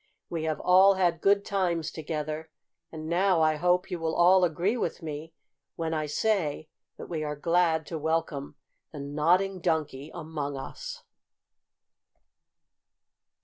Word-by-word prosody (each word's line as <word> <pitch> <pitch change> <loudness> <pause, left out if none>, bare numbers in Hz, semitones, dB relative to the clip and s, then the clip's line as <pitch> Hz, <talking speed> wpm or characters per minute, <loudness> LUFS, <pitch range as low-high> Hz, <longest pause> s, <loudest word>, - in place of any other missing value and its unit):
We 165 -2 -2
have 155 -1 -1
all 190 +2 +6
had 175 -3 +1
good 200 0 +3
times 175 -5 -1
together, 155 0 -4 0.4
and 155 -1 -7
now 175 0 +3
I 155 -1 +3
hope 180 +3 +1
you 180 - -2
will 160 0 -1
all 185 +2 +6
agree 175 +6 +1
with 230 - -3
me 155 +1 -6 0.4
when 165 -1 -2
I 155 -1 -1
say 155 -3 0 0.3
that - - -7
we 160 -3 -3
are 150 0 -3
glad 165 0 +2
to 165 - -5
welcome 160 -2 -2 0.4
the 150 - -8
Nodding 170 +7 +1
Donkey 150 -4 -1
among 155 -4 -5
us." 135 - -7
160 Hz, 140 wpm, -28 LUFS, 155-180 Hz, 0.4 s, all